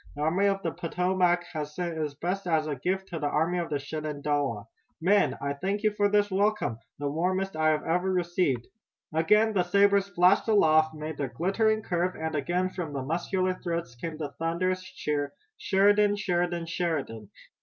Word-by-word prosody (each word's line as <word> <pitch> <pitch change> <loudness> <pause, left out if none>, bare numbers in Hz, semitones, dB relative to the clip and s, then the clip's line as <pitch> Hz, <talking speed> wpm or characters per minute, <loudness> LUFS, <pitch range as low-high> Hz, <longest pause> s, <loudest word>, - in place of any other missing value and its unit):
The 145 - -6
Army 180 +6 +2
of 195 -1 0
the 165 - -1
Potomac 180 +1 +1
has 150 -1 -5
sent 175 -2 -3
its 150 -2 -3
best 180 +5 -3
as 160 -2 +2
a 150 -2 -2
gift 190 +8 -2
to 165 - -4
the 150 - -1
Army 165 +5 +1
of 170 - -3
the 145 - 0
Shenandoah. 145 -6 -2 0.3
Men, 195 +5 +3
I 140 0 -2
thank 195 +8 -3
you 215 - +3
for 205 0 +1
this 205 0 +2
welcome, 200 - 0 0.2
the 145 - -3
warmest 185 +5 -1
I 155 0 +3
have 155 -1 +1
ever 180 +3 0
received!" 175 -9 0 0.5
Again 210 +8 +3
the 190 - +3
sabers 200 +2 +3
flashed 185 +2 +3
aloft, 160 -7 +4
made 155 0 -6
their 140 - -2
glittering 215 +5 +1
curve, 180 0 -1
and 160 0 -4
again 175 +5 0
from 165 -6 -5
muscular 175 +7 -1
throats 170 -8 -4
came 155 +6 -6
the 150 -3 -4
thunderous 185 +3 0
cheer: 145 -6 -3 0.3
"Sheridan! 205 +1 +3
Sheridan! 175 -3 -1
Sheridan!" 160 - -3
175 Hz, 175 wpm, -28 LUFS, 155-190 Hz, 0.5 s, aloft